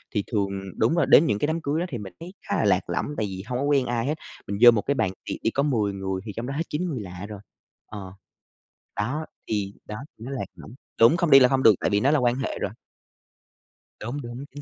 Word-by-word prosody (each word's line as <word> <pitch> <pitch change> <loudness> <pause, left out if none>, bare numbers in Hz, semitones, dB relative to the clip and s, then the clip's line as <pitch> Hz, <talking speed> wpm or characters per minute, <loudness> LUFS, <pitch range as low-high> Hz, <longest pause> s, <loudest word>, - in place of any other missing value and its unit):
Thì 105 - +1
thường 100 -3 +1 0.3
đúng 115 +9 +2
rồi 170 -4 +3
đến 160 - +8
những 105 -9 0
cái - - +1
đám 160 +1 -1
cưới 145 +2 -1
đó 175 - -1
thì 125 - -4
mình 100 -4 -8
thấy 175 +3 -9
khá 205 - 0
là - - +1
lạc 95 -3 +2
lõng, 85 - -1
tại 110 - 0
vì 95 -1 -6
hông 125 0 -2
có - - -1
quen 140 -3 +3
ai 120 -1 -1
hết, 150 - 0 0.3
mình 100 - -3
vô 120 -1 +11
một 110 -3 +1
cái 140 - -1
bàn 95 -7 +1 0.2
tiệc - - -3
đi 115 - +2
có 140 - +1
10 110 -9 +1
người 95 -1 -3
thì 105 - -5
trong 115 +2 -4
đó 140 - -3
hết 165 - 0
9 160 +5 -2
người 130 -7 -3
lạ 90 -1 -7
rồi, 105 -2 -7 0.5
ờ, 95 -3 -9 0.8
đó, 130 +10 -2 0.2
thì 100 -2 -1
đó 105 - -5 0.2
nó 120 +5 -7
lạc 135 - -3
lõng - - -12 0.3
đúng 115 +9 +6
không 170 -3 +1
đi 135 - +10
là 125 - +7
không 135 -1 +1
được 110 - +7
tại - - 0
vì 100 0 +2
nó 135 +6 +3
là 155 - +3
quan 120 -1 +2
hệ 135 +1 -3
rồi. 100 - -1 1.3
Đúng, 130 +6 -4
đúng, 120 +3 -7
chính 145 +2 -9
120 Hz, 265 wpm, -25 LUFS, 100-140 Hz, 1.3 s, vô